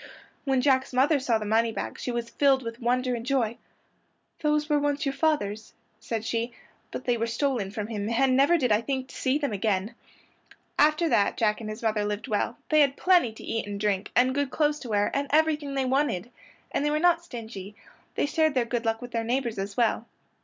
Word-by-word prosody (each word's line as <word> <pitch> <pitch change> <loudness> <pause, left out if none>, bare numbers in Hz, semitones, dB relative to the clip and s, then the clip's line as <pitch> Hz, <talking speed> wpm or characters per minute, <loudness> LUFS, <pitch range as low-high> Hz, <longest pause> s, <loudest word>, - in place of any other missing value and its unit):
When 265 -2 +2
Jack's 260 -1 +2
mother 280 +4 +3
saw 245 -4 +1
the 215 - -5
moneybags 225 +1 -1
she - - -3
was 235 -1 -3
filled 270 -2 +3
with 230 0 -6
wonder 250 +1 +1
and 235 -1 -3
joy. 240 -3 0 0.8
"Those 300 0 +1
were 295 -1 +2
once 290 0 -1
your 275 - 0
father's," 220 -9 -1 0.3
said 225 -1 -4
she, 230 +1 -2 0.4
"but - - -7
they 245 -1 +1
were 230 +1 -1
stolen 230 -4 -1
from 210 0 -4
him, 210 -1 -4
and 255 +2 +2
never 280 +6 +5
did 250 -7 0
I 210 +1 +4
think 260 +1 -3
to - - -12
see 265 +1 +1
them 285 -7 -2
again." 200 +1 -1 0.9
After 305 +3 +4
that 200 - +2
Jack 215 0 +1
and 215 - -5
his 215 +2 -7
mother 215 -2 +1
lived 210 +1 -3
well, 215 +2 -1
they 310 - +4
had 280 -2 +3
plenty 355 -11 +4
to 220 - -13
eat 225 -2 -3
and 200 0 -5
drink, 205 -2 0
and 255 +1 +4
good 285 0 0
clothes 300 +2 +1
to 245 - -8
wear, 205 -1 +1
and 280 0 -1
everything 300 -2 +1
they 270 -1 0
wanted. 255 -6 0 0.4
And - - 0
they 295 - +2
were 300 - +1
not 340 +1 +3
stingy; 220 - -8 0.4
they - - +1
shared 315 0 +1
their 250 -2 +2
good 235 0 -2
luck 225 +1 -1
with 245 - -8
their 230 -1 -1
neighbors 240 -2 -1
as 200 +1 -5
well. 235 -1 +1
245 Hz, 215 wpm, -27 LUFS, 220-280 Hz, 0.9 s, never